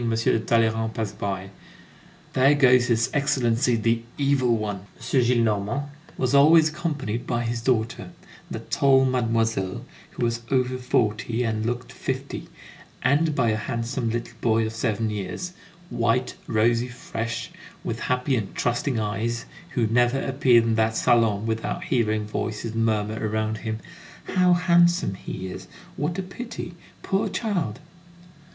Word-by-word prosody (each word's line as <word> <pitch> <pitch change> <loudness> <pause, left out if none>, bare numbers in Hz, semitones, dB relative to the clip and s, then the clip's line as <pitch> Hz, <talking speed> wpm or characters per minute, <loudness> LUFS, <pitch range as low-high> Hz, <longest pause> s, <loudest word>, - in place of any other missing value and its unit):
de 115 -1 +1
Talleyrand 110 0 +1
pass 110 -3 -2
by: 95 -2 -4 0.8
"There 135 +3 +5
goes 125 -3 +5
his 115 +1 +1
Excellency 125 -4 +2
the 115 +1 +1 0.2
Evil 135 -4 +2
One." 105 -2 -3 0.2
M. 125 +3 +1
Gillenormand 120 +2 +1 0.3
was 130 0 0
always 155 +3 +7
accompanied 150 -8 -3
by 120 -1 0
his 115 0 -2
daughter, 115 -2 0 0.4
that - - -7
tall 135 -1 +4
mademoiselle, 115 -6 0 0.2
who 120 - -2
was 115 0 -1
over 130 -1 +1
forty 115 -1 0
and 110 -1 -1
looked 120 +1 -3
fifty, - - -4 0.6
and 150 +2 +3
by 115 -4 +2
a - - +1
handsome 115 +2 -2
little 120 +1 -3
boy 115 -1 +2
of 110 - -4
seven 110 -1 -1
years, 105 - -4 0.4
white, 120 +2 +1
rosy, 115 +2 +2
fresh, 115 -2 -5 0.3
with - - -3
happy 125 +2 0
and 105 -5 -3
trusting 125 0 0
eyes, 115 +3 -2 0.3
who 120 - +2
never 120 +4 +2
appeared 130 -4 +4
in 115 0 +1
that 110 0 +1
salon 110 -3 +3
without 115 0 -2
hearing 110 -4 0
voices 110 +1 -3
murmur 110 -1 0
around 110 0 -1
him: 110 -1 -3 0.6
"How 180 -1 +5
handsome 175 - +3
he 95 0 -6
is! 95 0 -8 0.3
What 160 +5 -2
a 190 - -2
pity! 190 -2 -7 0.3
Poor 200 +2 0
child!" 185 - -2
115 Hz, 140 wpm, -25 LUFS, 110-130 Hz, 0.8 s, always